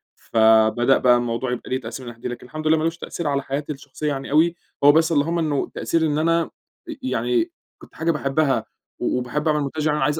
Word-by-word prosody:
فبدأ 110 Hz, +3 st, +4 dB
بقى 125 Hz, -1 st, +5 dB
الموضوع 120 Hz, +1 st, -2 dB
يبقى 125 Hz, -, -5 dB
ليه 130 Hz, +1 st, -1 dB
تأثير 120 Hz, +3 st, -7 dB
من 120 Hz, -, -6 dB
الناحية 115 Hz, 0 st, -18 dB
دي. -, -, -3 dB
لكن 120 Hz, -, -11 dB
الحمد 155 Hz, +5 st, -5 dB
لله 160 Hz, +1 st, +5 dB
ما 155 Hz, -, -1 dB
لوش 165 Hz, +1 st, -1 dB
تأثير 170 Hz, -1 st, -5 dB
على 140 Hz, -1 st, 0 dB
حياتي 140 Hz, +3 st, -3 dB
الشخصيّة 140 Hz, +2 st, -7 dB
يعني 140 Hz, -1 st, -4 dB
أوي، 165 Hz, +3 st, +4 dB, 0.3 s
هو 145 Hz, -, +9 dB
بس 160 Hz, +2 st, +3 dB
اللهم 165 Hz, +3 st, +1 dB
إنّه 150 Hz, -4 st, 0 dB
التأثير 165 Hz, -1 st, -1 dB
إن 150 Hz, -1 st, 0 dB
أنا 165 Hz, +1 st, +1 dB, 0.4 s
ي 270 Hz, -4 st, -5 dB
يعني 350 Hz, -1 st, 0 dB, 0.3 s
كنت -, -, -17 dB
حاجة 165 Hz, +1 st, +1 dB
باحبّها 140 Hz, -1 st, 0 dB, 0.3 s
و -, -, 0 dB
وباحب 125 Hz, +5 st, -2 dB
أعمل 150 Hz, -1 st, +2 dB
مونتاج، 150 Hz, +2 st, -2 dB
عايز 150 Hz, +1 st, +1 dB
145 Hz, 220 wpm, -22 LUFS, 130-160 Hz, 0.4 s, هو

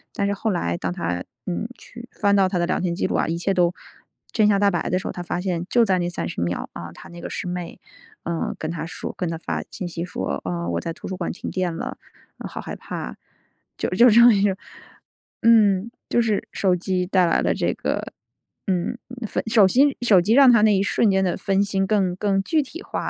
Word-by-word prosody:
但 200 Hz, -, 0 dB
是 200 Hz, -, 0 dB
后 210 Hz, +3 st, -2 dB
来 85 Hz, -, -1 dB
当 90 Hz, -, -3 dB
她， 90 Hz, 0 st, -3 dB, 0.2 s
嗯， 180 Hz, +4 st, -2 dB
去 240 Hz, +2 st, -12 dB
翻 200 Hz, -1 st, +3 dB
到 195 Hz, -1 st, +4 dB
他 185 Hz, -, -1 dB
的 175 Hz, -, +1 dB
聊 -, -, 0 dB
天 175 Hz, -1 st, -1 dB
记 -, -, -1 dB
录 -, -, -2 dB
啊， -, -, +2 dB
一 165 Hz, -, -1 dB
切 175 Hz, +3 st, 0 dB
都 180 Hz, -2 st, +2 dB, 0.6 s
真 215 Hz, -2 st, +3 dB
相 200 Hz, -1 st, +3 dB
大 200 Hz, 0 st, +4 dB
白 175 Hz, -4 st, -1 dB
的 185 Hz, -, +2 dB
时 -, -, -6 dB
候， -, -, -2 dB
她 180 Hz, -, -6 dB
发 175 Hz, 0 st, -3 dB
现 175 Hz, -2 st, -2 dB
就 240 Hz, -, +5 dB
在 195 Hz, -4 st, +2 dB
那 175 Hz, -1 st, -1 dB
30 175 Hz, -, -4 dB
秒 85 Hz, +1 st, -2 dB
啊， 85 Hz, 0 st, -7 dB
他 -, -, -13 dB
那 175 Hz, -, -11 dB
个 -, -, -6 dB
师 185 Hz, -, -4 dB
妹， 180 Hz, -1 st, -5 dB, 0.4 s
呃， 170 Hz, -1 st, -2 dB
跟 155 Hz, -, -3 dB
他 165 Hz, -1 st, -4 dB
说 165 Hz, +1 st, -6 dB
跟 180 Hz, -, -2 dB
他 165 Hz, 0 st, -3 dB
发 -, -, -3 dB
信 185 Hz, -, -5 dB
息 170 Hz, 0 st, -4 dB
说， 95 Hz, -, -3 dB
“呃， 85 Hz, -1 st, -3 dB
我 85 Hz, -1 st, -1 dB
在 165 Hz, -, -4 dB
图 -, -, -9 dB
书 185 Hz, -, -5 dB
馆， 175 Hz, -, -2 dB
停 -, -, -6 dB
电 180 Hz, -3 st, -2 dB
了， -, -, -5 dB, 0.4 s
呃， -, -, -7 dB
好 -, -, -7 dB
害 -, -, -6 dB
怕。” 60 Hz, -, -6 dB, 0.6 s
就 -, -, -1 dB
就 215 Hz, +7 st, +5 dB
这 235 Hz, +3 st, +7 dB
么， 240 Hz, -, +9 dB, 1.1 s
嗯， 215 Hz, -3 st, +5 dB, 0.2 s
就 240 Hz, -, +3 dB
是 220 Hz, -3 st, 0 dB
手 185 Hz, -2 st, +2 dB
机 180 Hz, 0 st, -1 dB
带 185 Hz, -1 st, +3 dB
来 165 Hz, -, +2 dB
了 -, -, +1 dB
这 -, -, 0 dB
个， -, -, -3 dB, 0.5 s
嗯， 185 Hz, +3 st, 0 dB, 0.5 s
手 220 Hz, -3 st, +6 dB
心 270 Hz, +7 st, +4 dB
手 210 Hz, -7 st, +5 dB
机 205 Hz, +6 st, +2 dB
让 270 Hz, 0 st, +8 dB
他 235 Hz, -3 st, +5 dB
那 215 Hz, -1 st, +5 dB
一 195 Hz, -, +2 dB
瞬 220 Hz, +1 st, +2 dB
间 190 Hz, 0 st, +2 dB
的 180 Hz, -, 0 dB
分 195 Hz, 0 st, +1 dB
心 195 Hz, -1 st, 0 dB
更 190 Hz, -4 st, +1 dB
更 195 Hz, 0 st, +1 dB
具 315 Hz, +8 st, +2 dB
体 330 Hz, +7 st, -9 dB
化 -, -, -4 dB
185 Hz, 250 characters per minute, -23 LUFS, 170-205 Hz, 1.1 s, 么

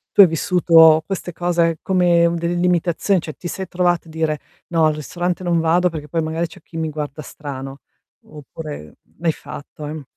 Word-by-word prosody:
Tu 205 Hz, -, +9 dB
hai 190 Hz, -, +9 dB
vissuto 165 Hz, -1 st, +5 dB
queste 185 Hz, -1 st, -4 dB
cose 170 Hz, -1 st, +1 dB
come 175 Hz, -3 st, +3 dB
delle 170 Hz, +1 st, -1 dB
limitazioni, 175 Hz, +1 st, +1 dB
cioè 155 Hz, -, -7 dB
ti 175 Hz, -, -6 dB
sei 190 Hz, +1 st, -5 dB
trovata 175 Hz, -2 st, 0 dB
a -, -, -13 dB
dire: 160 Hz, -2 st, -1 dB, 0.3 s
"No, 165 Hz, -2 st, +2 dB
al 155 Hz, -1 st, +2 dB
ristorante 175 Hz, +4 st, -3 dB
non 170 Hz, -1 st, +1 dB
vado 175 Hz, +2 st, +3 dB
perché 150 Hz, -2 st, -7 dB
poi 165 Hz, +3 st, -1 dB
magari 160 Hz, +2 st, -2 dB
c'è 160 Hz, -, -15 dB
chi 165 Hz, -, -10 dB
mi 160 Hz, -1 st, -1 dB
guarda 150 Hz, 0 st, -5 dB
strano", 135 Hz, -2 st, -8 dB, 0.4 s
oppure 150 Hz, -, -9 dB, 0.2 s
l'hai 165 Hz, -1 st, +1 dB
fatto? 150 Hz, 0 st, -10 dB
Ehm 150 Hz, 0 st, -6 dB
165 Hz, 185 wpm, -20 LUFS, 155-175 Hz, 0.4 s, Tu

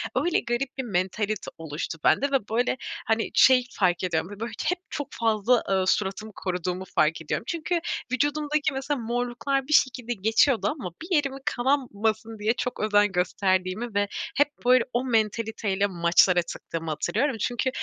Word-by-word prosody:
öyle 310 Hz, +7 st, +2 dB
garip 250 Hz, +3 st, -3 dB
bir 265 Hz, -, -2 dB
mentalite 200 Hz, 0 st, -2 dB
oluştu 160 Hz, 0 st, -5 dB
bende 280 Hz, +1 st, +3 dB
ve, 260 Hz, -7 st, 0 dB
böyle, 245 Hz, +3 st, +1 dB, 0.3 s
hani, 225 Hz, 0 st, 0 dB
şey 255 Hz, -1 st, +6 dB
fark 180 Hz, -3 st, +2 dB
ediyorum, 165 Hz, -1 st, -1 dB
b -, -, -18 dB
böyle, 230 Hz, +2 st, -4 dB
hep 360 Hz, 0 st, 0 dB
çok 290 Hz, -, -4 dB
fazla, 225 Hz, +1 st, +2 dB
ııı, 190 Hz, -1 st, +1 dB
suratımı 210 Hz, +2 st, 0 dB
koruduğumu 180 Hz, 0 st, -3 dB
fark 160 Hz, +2 st, +2 dB
ediyorum. 160 Hz, -, -3 dB
Çünkü 340 Hz, +1 st, -1 dB, 0.3 s
vücudumdaki 290 Hz, +2 st, 0 dB
mesela 270 Hz, +1 st, -2 dB
morluklar 245 Hz, +3 st, -1 dB
bir 305 Hz, -, 0 dB
şekilde 250 Hz, -4 st, +2 dB
geçiyordu 220 Hz, +1 st, +3 dB, 0.2 s
ama 235 Hz, -, -4 dB
bir 345 Hz, +2 st, -1 dB
yerim 280 Hz, -3 st, +1 dB
kanamasın 225 Hz, -5 st, -1 dB
diye 215 Hz, +2 st, +2 dB
çok 250 Hz, 0 st, -4 dB
özen 210 Hz, -1 st, +3 dB
gösterdiğimi 190 Hz, +4 st, 0 dB
ve 205 Hz, 0 st, +2 dB, 0.3 s
hep 290 Hz, -, +5 dB, 0.2 s
böyle 250 Hz, -1 st, +6 dB
o 245 Hz, +2 st, 0 dB
mentalite 220 Hz, -2 st, 0 dB
ile 200 Hz, +1 st, +2 dB
maçlara 175 Hz, 0 st, +4 dB
çıktığımı 165 Hz, -1 st, -6 dB
hatırlıyorum. 225 Hz, -, 0 dB
Çünkü 245 Hz, +4 st, 0 dB
225 Hz, 160 wpm, -26 LUFS, 190-260 Hz, 0.3 s, şey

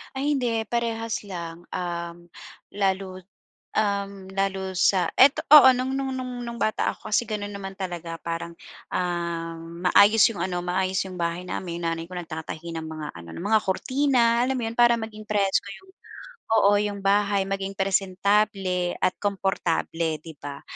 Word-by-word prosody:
Ay, 285 Hz, +3 st, 0 dB
hindi, 235 Hz, -4 st, 0 dB
parehas 230 Hz, -1 st, -2 dB
lang. 175 Hz, -4 st, -8 dB
Um, 170 Hz, -1 st, -5 dB, 0.5 s
lalo, 190 Hz, -2 st, -1 dB, 0.5 s
um, 200 Hz, -2 st, -1 dB
lalo 190 Hz, -1 st, -2 dB
sa 180 Hz, -1 st, +3 dB
eto, 270 Hz, +2 st, +6 dB
oo, 275 Hz, -3 st, +10 dB
no'ng-no'ng-no'ng 255 Hz, -1 st, -3 dB
no'ng 235 Hz, 0 st, -6 dB
bata 215 Hz, -, +1 dB
ako, -, -, -11 dB
kasi 215 Hz, +3 st, +2 dB
gano'n 210 Hz, -2 st, -4 dB
naman 195 Hz, -1 st, -6 dB
talaga 175 Hz, -3 st, -6 dB
parang, 170 Hz, 0 st, -4 dB, 0.4 s
ah, 170 Hz, -2 st, -2 dB
maayos 180 Hz, +6 st, +3 dB
'yong 200 Hz, -7 st, -3 dB
ano, 180 Hz, -1 st, -2 dB
maayos 185 Hz, +1 st, 0 dB
'yong 185 Hz, -1 st, -5 dB
bahay 170 Hz, +1 st, -3 dB
namin. 170 Hz, -2 st, -4 dB
Nanay 165 Hz, -1 st, -2 dB
ko, 180 Hz, -, -15 dB
nagtatahi 165 Hz, 0 st, -7 dB
ng 160 Hz, -, -4 dB
mga 155 Hz, -1 st, -6 dB
ano, 85 Hz, 0 st, -11 dB
ng 175 Hz, -, -7 dB
mga 220 Hz, -1 st, +5 dB
kurtina 240 Hz, +3 st, +2 dB
alam 265 Hz, +1 st, 0 dB
mo -, -, -4 dB
'yon? 230 Hz, -, -8 dB
Para 240 Hz, -1 st, +5 dB
maging 215 Hz, -1 st, -7 dB
presko 200 Hz, -1 st, +1 dB
'yong 380 Hz, 0 st, -20 dB, 0.6 s
oo, 205 Hz, -2 st, +4 dB
'yong 205 Hz, -1 st, -2 dB
bahay, 200 Hz, 0 st, +2 dB
maging 195 Hz, 0 st, -3 dB
presentable 195 Hz, -1 st, +1 dB
at 185 Hz, -, +1 dB
komportable 170 Hz, -5 st, -1 dB
'di 160 Hz, -3 st, -11 dB
ba? 140 Hz, -1 st, -8 dB
195 Hz, 155 wpm, -25 LUFS, 175-220 Hz, 0.6 s, oo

